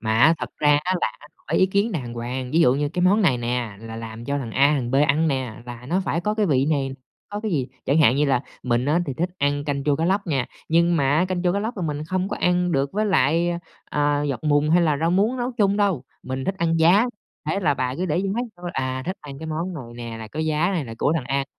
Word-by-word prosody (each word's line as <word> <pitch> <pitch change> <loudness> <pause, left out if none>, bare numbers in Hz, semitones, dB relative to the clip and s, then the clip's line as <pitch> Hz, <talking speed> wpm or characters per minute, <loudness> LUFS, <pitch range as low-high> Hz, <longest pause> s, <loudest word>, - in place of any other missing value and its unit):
mà 110 0 0
á 160 +6 +6
thật - - -5
ra 145 -1 +4
á 185 - +1
là 110 - 0 0.2
hỏi - - -2
ý 185 - +5
kiến 200 +3 +1
đàng 125 -7 -4
hoàng. 125 +2 -4
Ví 165 - +4
dụ 125 -5 +5
như 145 +1 0
cái 180 +3 -2
món 200 +4 +4
này 135 -9 +3
nè 120 -3 -2
là 115 0 -8
làm 115 0 -7
cho 140 +2 -1
thằng 120 -5 -5
A, 140 +5 +4
thằng 125 -4 -2
B - - -2
ăn 155 +3 +3
nè 130 -5 -2
là 120 0 -8
nó 180 +6 +1
phải 165 - 0
có 210 +3 -1
cái 215 -2 +1
vị 135 -3 +2
này, 135 -3 0 0.4
có 205 0 -5
cái 220 - -3
gì. 135 -8 -1 0.2
Chẳng 145 +4 +2
hạn 135 -3 +5
như 150 - +3
là 130 -3 +2 0.2
mình 120 0 +1
á, 155 +5 +2
thì 135 - -3
thích 175 +5 -1
ăn 145 0 0
canh 140 -2 -2
chua 145 -2 +2
cá 165 - 0
lóc 195 +2 +1
nha, 135 -6 0 0.2
nhưng 170 +1 +3
mà 140 0 +2
á 180 - +3
canh 180 -1 -2
chua 180 -1 +2
cá 200 - 0
lóc 225 +3 -3
là 185 - -3
mình 150 -1 -2
không 185 +3 -1
có - - -3
ăn 180 -1 +2
được 140 0 0
với 215 +1 0
lại, 170 -2 +2
a, 170 - -2 0.6
à, - - -1
dọc 130 +2 -5
mùng 150 0 +3
hay 175 +1 +5
là 155 -3 +2
rau 165 +1 +2
muống 210 +8 +2
nấu 245 +1 -2
chung 205 -4 +2
đâu, 190 -11 +1 0.2
mình 130 0 -4
thích 195 - -1
ăn 165 -1 +1
giá, 180 +8 +5 0.4
thế 200 - 0
là 150 -6 +2
bà 130 -1 -2
cứ 185 - -1
để 160 +1 0
giá 195 0 -1 0.3
thôi, 175 0 -6
à, 130 0 -2
thích 190 +2 -2
ăn 140 -2 -9
cái 160 - -7
món 165 +4 -3
này 135 -6 -6 0.3
nè 115 - -6
là 110 -1 -8
có 155 - -5
giá 155 +3 +1
này 170 -7 -1
là 115 - -7
của 150 - +2
thằng 155 -6 -1
A 135 0 0
150 Hz, 285 wpm, -23 LUFS, 130-180 Hz, 0.6 s, á